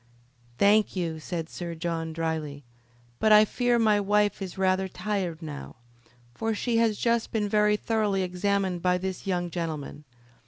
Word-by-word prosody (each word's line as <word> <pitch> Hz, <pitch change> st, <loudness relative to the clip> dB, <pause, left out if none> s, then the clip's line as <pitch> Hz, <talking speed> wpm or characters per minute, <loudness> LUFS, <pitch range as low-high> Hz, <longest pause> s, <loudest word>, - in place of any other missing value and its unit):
"Thank 205 Hz, +4 st, +4 dB
you," 165 Hz, -3 st, -2 dB
said 165 Hz, 0 st, -4 dB
Sir 170 Hz, 0 st, -6 dB
John, 165 Hz, -1 st, -3 dB
dryly. 160 Hz, -3 st, -3 dB, 0.6 s
"But 215 Hz, -, +3 dB
I 215 Hz, 0 st, +8 dB
fear 245 Hz, +2 st, +1 dB
my 215 Hz, -3 st, +3 dB
wife 205 Hz, 0 st, +1 dB
is 190 Hz, -1 st, -6 dB
rather 190 Hz, 0 st, +1 dB
tired 180 Hz, -3 st, -3 dB
now, 75 Hz, -, -7 dB, 0.6 s
for 225 Hz, -, -2 dB
she 230 Hz, +2 st, 0 dB
has 225 Hz, -2 st, +2 dB
just 235 Hz, -1 st, 0 dB
been 210 Hz, -2 st, 0 dB
very 210 Hz, 0 st, +3 dB
thoroughly 210 Hz, -4 st, 0 dB
examined 185 Hz, 0 st, -1 dB
by 180 Hz, 0 st, +2 dB
this 190 Hz, +1 st, -5 dB
young 175 Hz, -2 st, -1 dB
gentleman. 155 Hz, -3 st, -5 dB
190 Hz, 155 wpm, -27 LUFS, 170-210 Hz, 0.6 s, I